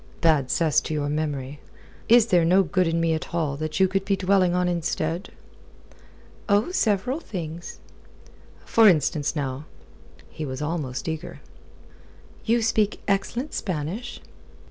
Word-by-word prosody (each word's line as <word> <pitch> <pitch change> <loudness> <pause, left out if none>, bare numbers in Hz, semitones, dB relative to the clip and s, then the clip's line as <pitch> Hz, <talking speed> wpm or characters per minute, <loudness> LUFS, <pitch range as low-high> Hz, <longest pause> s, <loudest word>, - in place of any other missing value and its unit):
"Bad 155 -6 +3
cess 160 -4 +2
to 155 - -4
your 145 -1 -1
memory. 145 -2 -3 0.5
Is 235 -1 +7
there 175 -2 +5
no 185 +4 +4
good 185 +1 +1
in 165 0 0
me 165 -1 +2
at 160 +2 -4
all 155 -4 0
that 155 +3 -3
you 190 - +5
could 195 +1 -1
be 200 0 +1
dwelling 185 -2 +2
on 180 0 +1
instead?" 170 0 -2 1.2
"Oh, 205 - +2
several 225 - 0
things." 170 - -7 0.9
"For 225 -1 +5
instance, 155 -3 +2
now?" 140 -1 -3 0.7
He 155 - -6
was 130 -3 -5
almost 150 -4 -3
eager. 160 +2 -5 1.0
"You 230 0 +2
speak 215 -2 +1
excellent 235 +7 -1
Spanish." 185 +7 -4
170 Hz, 140 wpm, -24 LUFS, 155-195 Hz, 1.2 s, Is